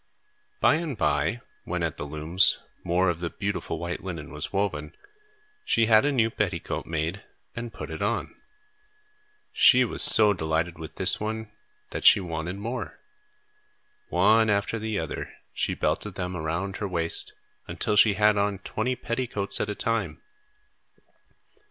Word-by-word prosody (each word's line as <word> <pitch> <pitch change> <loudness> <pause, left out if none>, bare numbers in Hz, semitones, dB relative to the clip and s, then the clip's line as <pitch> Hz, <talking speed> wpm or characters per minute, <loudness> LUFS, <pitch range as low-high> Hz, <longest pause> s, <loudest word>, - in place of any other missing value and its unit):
By 155 - +4
and 160 -7 -4
by, - - 0 0.2
when, - - -3
at - - -3
the 70 - -5
looms, 80 +5 +3 0.3
more 90 +2 +1
of 85 -2 -1
the 85 -1 -3
beautiful 100 +2 -4
white 85 0 -5
linen 85 -6 -7
was - - -5
woven, 80 -7 -2 0.7
she 115 - +2
had 110 +2 +5
a 145 - +2
new 115 -4 +1
petticoat - - -3
made 85 +5 -3 0.3
and 115 0 -6
put - - -8
it - - -6
on. - - -2 1.2
She 125 0 +5
was - - 0
so 105 -2 +9
delighted 80 -1 -2
with 80 -1 -9
this - - +4
one 110 0 -5 0.4
that - - -5
she - - +7
wanted 85 -1 -5
more. 115 +5 -6 1.1
One 110 0 +3
after 105 +2 0
the 110 -1 -3
other, 80 -5 -5 0.2
she - - -2
belted 105 -3 -2
them 90 0 -4
around 85 +4 -3
her 105 - -3
waist, 85 -3 -1 0.3
until 105 - -2
she 105 -1 +5
had 105 +1 +3
on 100 0 0
twenty 110 +6 -3
petticoats 115 -5 -2
at 105 - -2
a 105 - -3
time. 115 +1 -2
100 Hz, 150 wpm, -26 LUFS, 85-110 Hz, 1.2 s, so